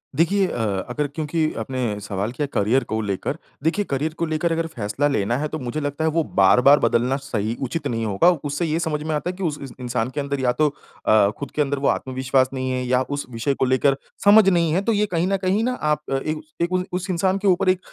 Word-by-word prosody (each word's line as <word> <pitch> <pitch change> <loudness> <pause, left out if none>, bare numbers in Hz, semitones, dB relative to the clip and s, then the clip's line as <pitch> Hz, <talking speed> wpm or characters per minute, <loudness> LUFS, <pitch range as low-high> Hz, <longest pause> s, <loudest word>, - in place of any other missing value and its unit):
देखिए, 190 +6 +3
अ, 105 - -2
अगर 145 +4 -1
क्योंकि 155 +2 -1
आपने 115 -3 -2
सवाल 100 +1 -3
किया 145 +4 -2
करियर 115 +6 +2
को 110 -2 -3
लेकर। 100 - -3 0.3
देखिए 195 +6 +1
करियर 145 +3 -2
को 170 - 0
लेकर 160 +1 -1
अगर 165 0 0
फैसला 125 -1 -1
लेना 120 -4 0
है 150 +2 -1
तो 155 - -5
मुझे 125 +3 -3
लगता 145 +1 -3
है 160 - +3
वो 165 +1 +1
बार-बार 125 +7 +5
बदलना 120 +3 +2
सही 115 -5 -3
उचित 140 +5 -2
नहीं 115 -1 -2
होगा। 105 - +4
उससे 145 +3 -2
ये 160 0 0
समझ 155 -3 -2
में 155 0 -2
आता 150 +4 -2
है 180 - -4
कि 195 - -6
उस 155 -4 -1
इ 140 - -6 0.2
इंसान 120 -1 -1
के 130 - -5
अंदर 140 0 -2
या 125 -2 +2
तो 155 +4 +2
अ, 110 -7 +1
ख़ुद 140 - -6
के 150 - +2
अंदर 140 -1 0
वो 140 - 0
आत्मविश्वास 130 0 +1
नहीं 130 -1 -2
है, 130 0 -1
या 125 +1 +2
उस 145 +2 -4
विषय 120 +3 -1
को 130 - 0
लेकर 130 +2 +3 0.3
समझ 205 0 +7
नहीं 170 -3 +2
है। 185 - +2
तो 230 - +2
ये 210 -1 +2
कहीं 175 -3 -1
न 195 0 +1
कहीं 190 +3 0
न 250 +1 -1
आप 150 0 +1
इन 155 +3 -2 0.3
उ 185 0 +1
उस 185 +1 -3
इंसान 185 +2 +1
के 200 +1 -1
ऊपर 185 0 +3
एक 185 -1 +3
145 Hz, 245 wpm, -22 LUFS, 125-165 Hz, 0.3 s, समझ